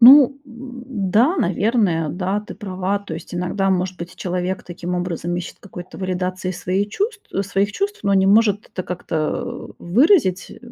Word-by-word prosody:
Ну, 275 +2 +9
м, 250 +1 -9 0.3
да, 255 - +4
наверное, 190 -4 +2
да, 190 +3 -1
ты 210 - -9
права. 190 0 -2
То 200 -5 -7
есть 165 - -8
иногда, 180 +2 0
может 185 0 0
быть, 175 +1 -7
человек 180 +1 -2
таким 175 0 -5
образом 175 -1 -2
ищет 175 - -5
какой-то 180 -3 -10
валидации 185 0 -2
своей 185 +2 -1
чувств, 415 - -2 0.2
своих 200 +1 0
чувств, 405 +1 -2
но 200 - +2
не 190 0 +4
может 205 0 +4
это 185 - -4
как-то, 180 -2 -4 0.6
э, - - -18
выразить, 220 - +3
э. - - -11
190 Hz, 170 wpm, -21 LUFS, 180-225 Hz, 0.6 s, Ну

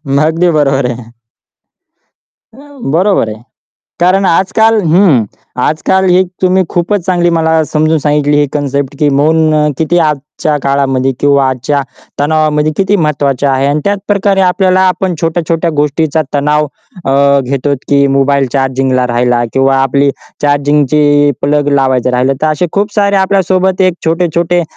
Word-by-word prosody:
मग 145 +2 +2
अगदी 165 +3 +1
बरोबर 140 -4 +1
आहे. 120 -1 -10 1.4
अ, - - -21 0.4
बरोबर 185 - +1
आहे. 110 +1 -9 0.6
कारण 185 +3 +2
आजकाल 220 +5 +2
हं. 160 - +3 0.4
आजकाल 175 +7 0
ही 180 +1 +4 0.2
तुम्ही 185 +1 +2
खूपच 180 +4 -1
चांगली 175 -2 +1
मला 160 0 +1
समजून 155 +1 0
सांगितली 145 0 0
ही 145 - +1
कन्सेप्ट 140 -1 -3
की 150 - +2
मौन 155 0 +2
किती 165 +2 +1
आजच्या 150 -1 -1
काळामध्ये 135 -1 0
किंवा 140 -2 +2
आजच्या 130 +2 -1 0.4
तणावामध्ये 155 0 +1
किती 195 +1 +1
महत्त्वाचे 145 -5 -1
आहे 135 0 +1
आणि 145 +2 0
त्याचप्रकारे 200 0 0
आपल्याला 185 0 +2
आपण 185 0 -2
छोट्या-छोट्या 165 0 -1
गोष्टीचा 150 +2 0
तणाव 150 +1 +1 0.4
अ, 140 +1 +2
घेतो, 135 +2 -2
की 140 0 +3
मोबाईल 140 0 +1
चार्जिंगला 130 -1 0
राहिला 120 0 0
किंवा 135 0 +2
आपली 140 +1 +1 0.3
चार्जिंगची 145 0 +2
प्लग 145 0 +1
लावायचं 130 -2 +1
राहिलं. 125 +2 +1
तर - - +2
असे 155 +4 -1
खूप 205 +1 -1
सारे 200 -1 +1
आपल्या 195 0 +1
सोबत 185 0 0
एक 185 -2 +2
छोटे-छोटे 170 +1 0
150 Hz, 140 wpm, -11 LUFS, 140-175 Hz, 1.4 s, ही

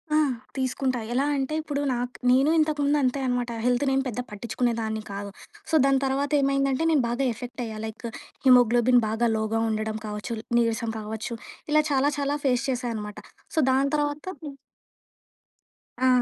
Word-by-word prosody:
ఆ! - - +5 0.4
తీసుకుంటా. 260 -1 0
ఎలా 265 +3 +2
అంటే 270 +2 -2
ఇప్పుడు 290 -2 -3
నాకు 245 +1 -3 0.2
నేను 265 +4 +4
ఇంతకు 310 -1 +1
ముందు 290 +1 +3
అంతే 255 +2 +1
అనమాట. 245 -1 0 0.2
హెల్త్ 245 +2 +2
నేను 270 0 +2
పెద్దగా 250 0 -4
పట్టించుకునేదాన్ని 225 0 -2
కాదు. 200 0 -5 0.4
సో, 320 - +2
దాని 275 -1 +4
తర్వాత 275 +2 0
ఏమైందంటే, 275 +1 +1
నేను 295 -5 +3
బాగా 245 +3 0
ఎఫెక్ట్ 245 +3 -7
అయ్యా. 220 -1 -6
లైక్ 220 +2 -8 0.4
హిమోగ్లోబిన్ 245 0 +6
బాగా 225 +2 +1
లోగా 220 +1 0
ఉండడం 215 0 -2
కావచ్చు, 210 +2 -4 0.2
నీరసం 230 -1 0
కావచ్చు, 220 +2 -5 0.4
ఇలా 305 0 +5
చాలా, 280 +1 +3
చాలా 285 0 0
ఫేస్ 255 -1 +2
చేసా 250 -1 -1
అనమాట. 210 -1 -6 0.4
సో, - - +3
దాని 270 +1 +2
తర్వాత 290 0 -2 0.2
హ్మ్. 285 -2 -7 1.5
ఆ! - - +5
250 Hz, 160 wpm, -26 LUFS, 225-275 Hz, 1.5 s, హిమోగ్లోబిన్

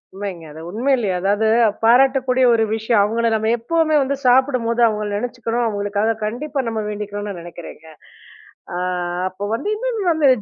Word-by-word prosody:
உண்மைங்க. 190 -5 -6
அது 160 +2 -10
உண்மையிலேயே 235 -2 0
அதாவது 205 +3 +1 0.4
பாராட்டக்கூடிய 260 +1 +4
ஒரு 225 -1 +3
விஷயம். 220 -1 +2
அவங்கள 230 +3 0
நம்ம 220 +1 0
எப்பவுமே 315 +5 +1
வந்து 275 +1 0
சாப்பிடும்போது 250 -2 +2
அவங்கள 210 -1 -2
நினைச்சிக்கணும், 240 0 -2
அவங்களுக்காக 205 +1 -1
கண்டிப்பா 270 +6 -2
நம்ம 225 -1 -2
வேண்டிக்கணும்னு 205 0 -5
நா 175 - -7
நினைக்கிறேங்க. 170 -2 -11 0.9
அ - - -2 0.5
அப்போ 195 +2 -6
வந்து 405 - -4
இன்னொன்னு 455 -3 -3
வந்து 300 -4 +3
230 Hz, 145 wpm, -20 LUFS, 205-260 Hz, 0.9 s, பாராட்டக்கூடிய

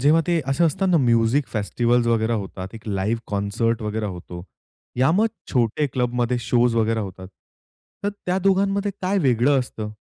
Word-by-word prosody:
जेव्हा 150 +5 +4
ते 170 -2 +2
असे 135 +5 +2
असतात 180 +5 +1
ना 175 - +4
म्युझिक 120 +1 +2
फेस्टिव्हल्स 120 +3 0
वगैरे 115 0 +1
होतात, 95 -3 -4
एक 110 - -11
लाईव्ह 105 +4 -1
कॉन्सर्ट 110 +3 -1
वगैरा 105 0 -2
होतो. 90 -2 -8 0.5
या 130 +3 +3
मग 210 +6 +3 0.3
छोटे 125 +3 +1
क्लबमध्ये 125 -1 0
शोज 120 0 +2
वगैरे 115 0 +1
होतात. 95 -2 -7 0.8
तर - - +2 0.2
त्या 180 +1 +1
दोघांमध्ये 195 +1 +1
काय 190 +2 +1
वेगळं 135 -2 +3
असतं? 110 -4 -4
120 Hz, 160 wpm, -22 LUFS, 110-145 Hz, 0.8 s, जेव्हा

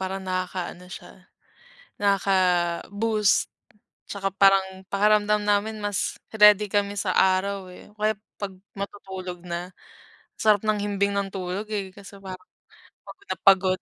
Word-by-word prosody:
parang 190 0 -4
nakakaano 185 -1 -4
siya, - - -12 0.7
nakaka-boost 195 +2 +1 0.6
tsaka 195 -1 -3
parang 190 -1 +2
pakiramdam 210 +1 +2
namin 210 +1 0
mas 205 -2 -1 0.2
ready 210 -1 +6
kami 205 -1 0
sa 200 - -2
araw, 190 +1 +2
eh. 180 - -14
O 210 - -27
kaya 215 +1 +1 0.2
'pag 200 -2 -5 0.2
matutulog 190 -3 -7
na. 175 +1 -6 0.7
Sarap 210 -2 +4
ng 215 -1 +1
himbing 200 0 0
ng 200 -1 0
tulog, 185 +2 -4
eh, 200 -3 -4
kaso 200 0 -13
parang 185 -1 -9 0.6
pagod 395 - -13
na - - 0
pagod. 190 -1 +5
195 Hz, 130 wpm, -25 LUFS, 185-205 Hz, 0.7 s, ready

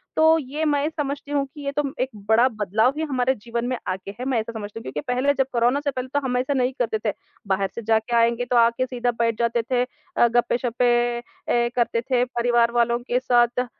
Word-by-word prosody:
तो 320 +1 +5
ये 295 +2 -3
मैं 290 -1 +1
समझती 290 -2 -4
हूँ 285 -1 +1
कि 295 - -10
ये 280 - -1
तो 295 +1 -1 0.2
एक 260 - 0 0.2
बड़ा 230 +3 +5
बदलाव 220 +6 +2
है 320 - 0
हमारे 260 -1 +1
जीवन 235 +2 -4
में 255 - -1
आ 185 - 0
गया 190 +1 -9
है। 250 - -4
मैं 250 -4 +2
ऐसा 225 +1 -4
समझती 210 0 -6
हूँ - - -11
क्योंकि 135 +3 -4
पहले 270 +3 +2
जब 270 -1 +1
कोरोना 240 +3 +2
से 290 -1 -1
पहले 255 -1 -4
तो 285 - +3
हम 250 -1 0
ऐसा 260 +3 0
नहीं 255 -1 +1
करते 225 -3 0
थे। - - -2 0.3
बाहर 195 0 0
से 235 - -4
जाके 220 +1 +1
आएँगे 235 +1 +2
तो 245 - -1
आ 235 -1 +6
के 255 - +1
सीधा 245 -1 -1
बैठ 230 -1 +1
जाते 235 0 +1
थे, 245 +2 0
अ, 250 -1 -1
गप्पे-शप्पे 240 +1 +1 0.6
ऐ 240 0 +2
करते 235 -1 +1
थे 245 0 +1
परिवार 240 -1 +2
वालों 235 0 +2
के 245 0 -1
साथ 245 -1 +2
245 Hz, 235 wpm, -23 LUFS, 235-260 Hz, 0.6 s, आ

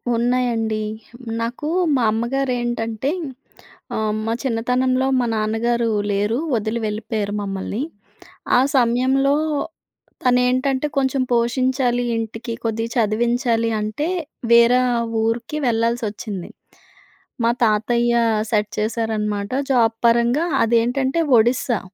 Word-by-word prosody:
ఉన్నాయండి. 230 -2 0 0.3
హ్మ్, 240 -1 -10
నాకూ 245 +6 -3 0.3
మా 250 - +1
అమ్మగారేంటంటే, 240 0 -1 0.8
ఆహ్, 215 -1 0
మా 225 - 0
చిన్నతనంలో 255 +2 +1
మా 245 - +1
నాన్నగారు 225 +2 0 0.2
లేరు, 205 +4 0 0.2
వదిలి 220 +2 -1
వెళ్ళిపోయారు 210 -1 -3
మమ్మల్ని. 195 +4 -3 0.7
ఆ - - +6 0.2
సమయంలో 260 +3 +2 0.9
తనేంటంటే, 255 +3 +2
కొంచెం 265 0 +1
పోషించాలి 245 +1 +1
ఇంటికి, 225 +1 -5
కొద్దిగా 225 +1 -2
చదివించాలి 230 +1 +1
అంటే, 215 +10 -2 0.4
వేరా 235 +2 +6 0.4
ఊరికి 230 +6 -2
వెళ్ళాల్సోచ్చింది. 225 -4 -2 0.9
మా 230 - +4
తాతయ్య 235 +2 +2 0.4
సెట్ 210 -1 +1
చేశారనమాట. 210 -2 -2 0.2
జాబ్ 230 -3 +3
పరంగా, 235 +7 +3 0.2
అదేంటంటే 245 +6 +1 0.2
ఒడిస్సా. 240 0 +2
235 Hz, 95 wpm, -21 LUFS, 220-250 Hz, 0.9 s, ఆ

